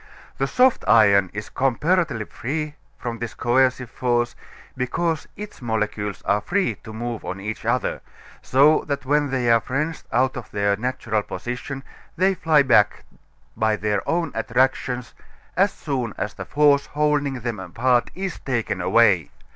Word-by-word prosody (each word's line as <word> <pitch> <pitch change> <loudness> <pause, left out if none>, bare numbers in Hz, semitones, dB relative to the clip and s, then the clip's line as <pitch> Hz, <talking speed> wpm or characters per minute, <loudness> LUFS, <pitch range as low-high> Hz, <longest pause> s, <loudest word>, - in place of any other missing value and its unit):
The 135 - +1
soft 255 - +3
iron 100 -4 +5
is 105 +1 -6
comparatively 135 -1 +1
free 150 +7 -4 0.2
from 120 -1 -5
this 120 -1 -5
coercive 125 0 +1
force, 120 -1 0 0.4
because 155 +5 -1
its 210 -7 -9
molecules 105 -3 -2
are 105 +1 +1
free 190 - 0
to 110 - -9
move 115 +1 -5
on 95 - -5
each 105 +2 -5
other, - - 0 0.4
so 145 +4 +4
that 140 -2 -3
when 145 +1 +2
they 125 -3 +1
are 115 0 +5
wrenched 150 +4 -2
out 130 +2 +2
of 120 -3 -7
their 100 0 +1
natural 115 -1 -1
position 125 +5 -6 0.3
they 190 +3 +3
fly 160 -5 +3
back 105 -6 +3 0.5
by 110 -1 +1
their 105 -1 -1
own 170 0 0
attractions 125 +1 0 0.4
as 195 +2 +3
soon 130 -7 -3
as 105 - -3
the 95 - -7
force 145 +3 +3
holding 145 -3 0
them 115 -3 -3
apart 120 +7 +1
is 190 -1 -4
taken 115 -7 -2
away. 95 -3 +4
125 Hz, 150 wpm, -23 LUFS, 110-145 Hz, 0.5 s, iron